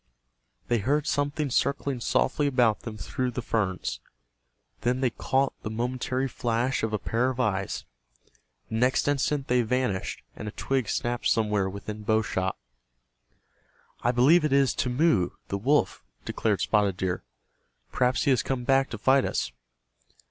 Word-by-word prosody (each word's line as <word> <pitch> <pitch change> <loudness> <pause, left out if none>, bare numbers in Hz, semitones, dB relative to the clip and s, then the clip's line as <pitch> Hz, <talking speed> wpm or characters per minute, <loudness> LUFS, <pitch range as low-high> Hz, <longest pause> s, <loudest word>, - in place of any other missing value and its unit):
They 120 -1 +2
heard 145 +7 +1
something 145 -1 -1
circling 140 0 0
softly 145 +4 +1
about 125 -6 +3
them 110 -2 -7
through 125 +7 -2
the 125 +1 -4
ferns. 95 -7 -1 0.8
Then 125 +1 0
they 130 -3 +2
caught 135 +4 0
the 105 - -4
momentary 125 +3 -1
flash 120 +1 -1
of 110 - -1
a 105 - +1
pair 120 +5 0
of 130 -1 -5
eyes. 100 -6 -1 0.8
The 110 - -2
next 125 +3 +2
instant 145 0 0
they 125 0 +3
vanished, 120 -4 -1
and 105 - -7
a - - -3
twig 130 -5 -1
snapped 120 0 -1
somewhere 105 -3 +1
within 105 +2 -7
bow 110 +1 +2
shot. 95 -3 -2 1.4
"I 120 - +1
believe 140 +8 +5
it 150 - +1
is 140 -1 +4
Timmeu, 125 - +1 0.2
the 100 - -2
wolf," 140 +8 +1 0.2
declared - - 0
Spotted 100 -3 +2
Deer. 90 -1 -2 0.7
"Perhaps 125 0 +1
he 140 - +3
has 125 - +3
come 130 -2 -2
back 135 +1 +3
to 115 - -5
fight 130 +5 +4
us." - - -1
125 Hz, 155 wpm, -27 LUFS, 110-135 Hz, 1.4 s, believe